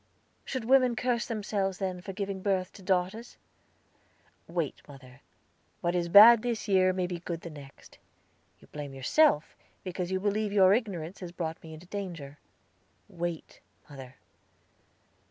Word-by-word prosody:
"Should 260 -4 -4
women 255 -1 +4
curse 240 -1 -1
themselves, 200 -4 -2
then, 185 -2 -3
for 195 - -7
giving 195 -1 -4
birth 185 -2 -1
to 200 - -13
daughters?" 190 +5 -2 1.1
"Wait, 165 -3 -3
mother; 135 -2 -14 0.6
what 175 0 0
is 175 -1 -1
bad 215 +5 +9
this 230 -3 -3
year 185 -2 +4
may 185 -1 -1
be 175 -1 -5
good 170 -1 -5
the 170 - -8
next. 140 -2 -14 0.6
You - - -19
blame 145 -2 -7
yourself, 155 - +2 0.3
because 180 -1 -4
you 190 - 0
believe 210 +1 -1
your 195 -2 +5
ignorance 190 -7 -3
has 180 -2 -7
brought 165 -2 -5
me 160 - -11
into 160 +3 -13
danger. 170 -8 -7 0.7
Wait, 175 -3 -5 0.3
mother." 135 -3 -11
185 Hz, 145 wpm, -29 LUFS, 165-205 Hz, 1.1 s, bad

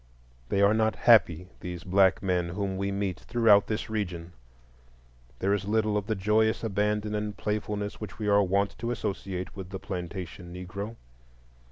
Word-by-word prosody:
They 100 - +2
are 100 +1 +5
not 110 -1 +2
happy, 90 -7 +5
these 90 -1 -6
black 95 0 +3
men 90 -2 0
whom 95 +1 -2
we 100 +1 -2
meet 100 -3 -2
throughout 115 -4 +4
this 110 - -2
region. 90 -6 -4 1.0
There 100 +7 +1
is 100 -2 -1
little 110 0 +1
of 105 -1 -1
the 110 - 0
joyous 110 +3 +2
abandon 105 0 0
and 105 -1 -3
playfulness 105 -1 -3
which 105 - -7
we 105 - -3
are 100 0 +5
wont 100 +1 +1
to 115 - -3
associate 95 -5 -4
with 95 -2 -7
the 95 - -5
plantation 90 -1 -6
Negro. 100 +5 -6
100 Hz, 165 wpm, -28 LUFS, 95-105 Hz, 1.0 s, are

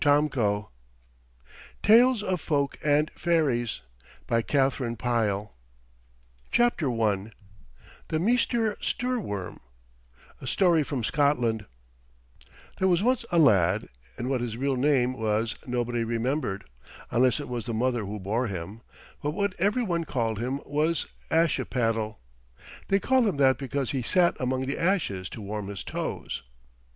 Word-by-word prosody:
241 135 -9 +2 1.2
TALES 230 +1 +6
OF 185 -4 -1
FOLK 140 -3 0
AND 150 +1 +2
FAIRIES 135 - +1 0.5
THE 115 -4 0 2.7
MEESTER 225 +1 +1
STOORWORM 205 - -2 0.8
A 130 - -7
STORY 175 +1 +3
FROM 140 -4 -3
SCOTLAND 120 -4 +1 1.1
There 190 - +3
was 180 +1 +3
once 250 0 +2
a 175 - +2
lad, 100 - +4 0.3
and 125 - -3
what 130 -2 0
his 115 -2 -3
real 135 +1 0
name 130 -2 +2
was 110 -2 -1
nobody 120 -1 -1
remembered, 115 -2 -1 0.5
unless 125 +3 +3
it 145 - -5
was 120 -2 -4
the 115 - -2
mother 120 0 0
who 105 +1 -5
bore 110 +6 -1
him; 100 +3 -6 0.4
but 150 +2 -2
what 200 -2 0
every 210 +7 +2
one 170 -5 -1
called 115 -7 -1
him 130 +4 -2
was 155 +3 0 0.2
Ashipattle. 115 -9 +1 0.7
They 195 - +3
called 260 +2 +3
him 190 - -1
that 135 -2 +4
because 135 -1 -2
he 135 - -1
sat 175 +8 +3
among 130 +1 -1
the 140 - -3
ashes 160 - 0
to 110 - -8
warm 105 0 -4
his 100 -1 -6
toes. - - -4
130 Hz, 125 wpm, -27 LUFS, 115-165 Hz, 2.7 s, TALES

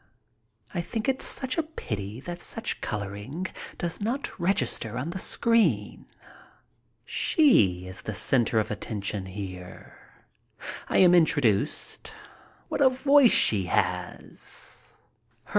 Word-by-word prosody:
I 175 - -1
think 220 +7 -4
it 265 -1 +1
such 265 +4 -1
a - - +4
pity 110 - -6
that 175 +3 -6
such 225 0 -3
coloring 105 - -4 0.3
does 170 +1 -3
not 240 +4 -3
register 170 - 0
on 145 +7 -3
the 190 - -5
screen. 185 - +1 1.0
She 100 - +3
is 95 0 -8
the 110 - -5
center 115 +2 +2
of 110 - -2
attraction 100 -2 -3
here. 95 -2 -8 0.9
I - - +1
am 180 -2 +7
introduced. 145 - +2 0.5
What - - -2
a 265 - +7
voice 275 0 +5
she 95 -4 +3
has! - - -4
145 Hz, 115 wpm, -27 LUFS, -, 1.0 s, am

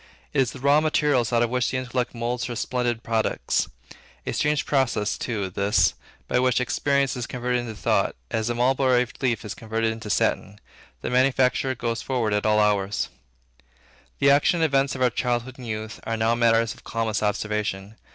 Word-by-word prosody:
It 140 - +3
is 130 - +1
the 135 - -10
raw 140 +3 +4
material 150 -3 +2
out 120 0 +3
of 120 - -1
which 125 -1 +1
the 130 - -2
intellect 125 -1 -2
moulds 120 +1 -2
her 120 - -4
splendid 120 -1 -1
products. 115 -1 0 0.6
A - - -2
strange 150 -1 +1
process 120 -7 +1
too, 100 -5 -3
this, 100 +2 +2 0.3
by - - +1
which 125 -1 +2
experience 140 +1 +1
is 125 -2 -4
converted 125 0 -1
into 115 -2 -6
thought, - - +1 0.2
as 110 +1 -1
a 120 - -1
mulberry 125 0 +3 0.2
leaf 120 -6 0
is 105 - -4
converted 115 0 -1
into 110 -1 -7
satin. 100 0 0 0.4
The - - -3
manufacture 130 0 +2
goes 115 -1 -2
forward 120 -5 -1
at 105 +1 +1
all 105 0 +4
hours. 105 -1 +1 1.1
The 140 0 +4
actions 145 +4 +3
and - - +4
events 135 -3 +1
of 130 - -1
our 125 - +3
childhood 125 +2 -2
and 125 - -8
youth, 110 -1 -5
are 115 - -2
now 110 +1 +2
matters 115 -1 +3
of - - -18
calmest 115 -2 -2
observation. 105 -1 -2
120 Hz, 185 wpm, -24 LUFS, 110-130 Hz, 1.1 s, raw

